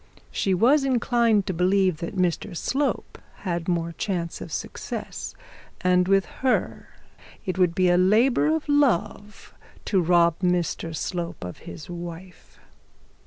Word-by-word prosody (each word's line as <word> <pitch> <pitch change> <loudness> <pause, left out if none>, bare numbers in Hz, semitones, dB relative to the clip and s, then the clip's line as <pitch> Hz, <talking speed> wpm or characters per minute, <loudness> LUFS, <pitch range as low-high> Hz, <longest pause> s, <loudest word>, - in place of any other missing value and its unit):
She 190 -2 +1
was 265 +10 +4
inclined 235 -5 +2
to 190 - -2
believe 185 0 +2
that 170 +5 -6
Mr 175 -2 -1
Slope 275 - -2 0.2
had 175 -3 -3
more 170 -2 0
chance 170 -2 -3
of - - -8
success; - - -5 0.5
and 180 -1 +3
with 195 0 +3 0.2
her 260 -1 0 0.6
it 185 0 -3
would 175 -2 +3
be 185 -1 +3
a 175 0 +4
labour 225 +10 +4
of 315 0 0
love 210 -8 0 0.3
to 190 -3 +2
rob 170 -1 +3
Mr 175 -2 -1
Slope 170 - -4
of 90 0 -7
his 85 -2 -9
wife. 175 +1 -9
185 Hz, 135 wpm, -25 LUFS, 170-215 Hz, 0.6 s, was